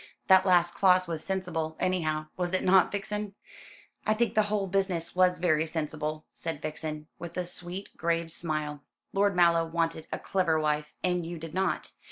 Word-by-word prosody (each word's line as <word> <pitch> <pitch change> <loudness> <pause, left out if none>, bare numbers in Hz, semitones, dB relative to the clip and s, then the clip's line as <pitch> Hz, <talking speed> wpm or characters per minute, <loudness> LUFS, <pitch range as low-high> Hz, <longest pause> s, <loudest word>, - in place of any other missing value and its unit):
"That 190 0 +7
last 175 -1 +4
clause 185 -2 +4
was 165 -2 -3
sensible, 170 -5 -2
anyhow, 155 -4 0
was 180 0 -2
it 185 - +1
not, 185 0 +5
Vixen?" 205 0 -3 0.7
"I 215 - +2
think 235 +1 +1
the 215 - +4
whole 205 -2 0
business 185 -3 0
was 180 0 +4
very 160 -2 +2
sensible," 155 -1 -3
said 165 -3 -4
Vixen, 155 0 -5
with 170 +1 -7
a 180 - -1
sweet 180 +2 -6
grave 170 -1 0
smile; 155 -3 -2 0.3
"Lord 200 0 +2
Mallow 170 -1 +5
wanted 165 -1 -1
a - - -1
clever 175 -5 +1
wife 150 -1 -1
and 180 -1 +1
you 170 +1 -5
did 160 -1 -8
not. 190 +1 -1
175 Hz, 175 wpm, -29 LUFS, 160-185 Hz, 0.7 s, That